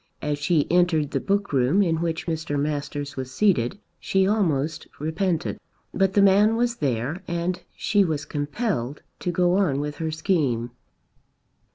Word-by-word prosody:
As 150 -1 -1
she 145 0 +2
entered 175 -5 +3
the - - 0
book 200 -3 -1
room 135 +10 +3
in 165 -3 +1
which 165 -1 -2
Mr. 160 -3 -2
Masters 145 -1 -3
was 130 -1 -5
seated 180 - +2 0.2
she 190 0 +1
almost 160 -7 0
repented. 160 +3 -1 0.3
But 195 -1 +2
the 200 - +5
man 205 +3 +5
was 240 0 0
there 135 +5 -1
and 175 +1 -2
she 205 -2 +2
was 155 -4 -2
compelled 145 - -3 0.2
to 180 - -2
go 180 +1 +2
on 160 -9 +2
with 145 0 -4
her 160 -1 -2
scheme. 145 - 0
160 Hz, 155 wpm, -24 LUFS, 145-190 Hz, 0.3 s, the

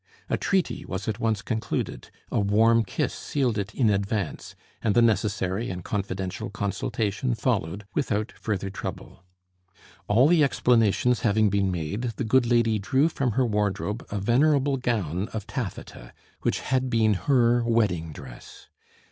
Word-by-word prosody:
A - - +3
treaty 190 -3 0
was 95 +1 -5
at 110 0 -2
once 110 -3 0
concluded; 110 -2 -3 0.2
a - - +1
warm 110 +3 +4
kiss 95 - -2
sealed 125 -7 -1
it 100 0 -3
in 115 -5 +3
advance, 100 -2 -2 0.3
and 105 -3 +1
the 120 - +6
necessary 105 -1 0
and 90 -1 -5
confidential 95 -2 -3
consultation 105 +4 -2
followed 105 -5 -1
without 105 0 -1
further 100 -3 -3
trouble. 95 -1 -7 0.8
All 120 +7 +5
the 165 -2 +5
explanations 125 -2 +2
having 110 -2 +2
been 100 -1 +1
made, 100 +8 -3
the - - -3
good 120 +2 +3
lady 115 -2 +2
drew 130 - +2
from 135 -7 -1
her 130 +4 +2
wardrobe 105 0 -1
a 105 - -3
venerable 135 +6 +3
gown 105 - -1
of 110 -3 -4
taffeta, 100 - -6 0.3
which - - 0
had 130 0 0
been 110 -3 +3
her 120 +2 +2
wedding 105 -9 +1
dress. 65 -5 -12
110 Hz, 150 wpm, -26 LUFS, 100-120 Hz, 0.8 s, the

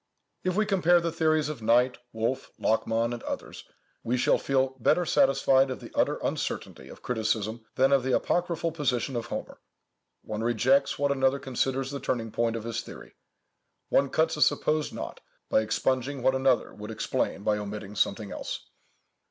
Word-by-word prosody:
If 185 -1 0
we 215 +1 +2
compare 175 -4 +4
the 170 0 -2
theories 155 -2 +2
of 150 -6 -5
Knight, 125 +3 +3
Wolf, 115 +4 -2
Lachmann, 115 +1 +1
and 120 - -6
others, - - -6 0.4
we 125 +2 -1
shall - - +3
feel 135 -1 +1
better 165 +9 +3
satisfied 135 -3 +4
of 130 - -4
the - - -11
utter - - +2
uncertainty - - -3
of - - -13
criticism 110 -1 -1
than 135 +1 +4
of 140 -1 +5
the 130 0 -1
apocryphal 170 -1 0
position 135 -5 -1
of 120 - -3
Homer. - - -6 0.6
One 105 0 -4
rejects 125 +4 +2
what 140 0 +1
another 135 0 +2
considers 135 0 -1
the 140 - -4
turning 115 -5 -2
point 115 0 0
of 115 - -4
his 115 -1 -3
theory. - - -11 0.8
One 140 0 +3
cuts 160 +3 +1
a 150 - -5
supposed 155 0 +2
knot - - -6 0.3
by - - +4
expunging 130 +4 -1
what 130 - +4
another 130 -1 +2
would 105 +1 -9
explain 110 -2 -2
by 105 0 +1
omitting 105 0 -6
something 100 +1 0
else. - - -6
130 Hz, 170 wpm, -28 LUFS, 115-140 Hz, 0.8 s, of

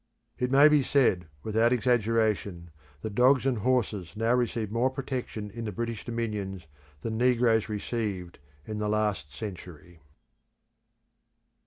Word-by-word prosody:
It 125 - 0
may 140 +3 +7
be 150 -1 +5
said, 120 - +2 0.2
without 110 +2 +2
exaggeration, 110 -7 +1 0.3
that 110 - -4
dogs 130 +4 +4
and 130 -4 +1
horses 110 -6 0
now 115 +2 +1
receive 115 -4 0
more 120 +3 +2
protection 125 -5 -5
in 115 +2 -6
the 105 - -3
British 115 +2 -4
dominions 105 -6 -4 0.4
than 110 +4 -3
negroes 120 -3 +3
received 105 -4 -4 0.3
in 105 -1 -5
the 105 0 -1
last 105 -8 -1
century. 85 -2 -9
110 Hz, 130 wpm, -28 LUFS, 100-125 Hz, 0.4 s, may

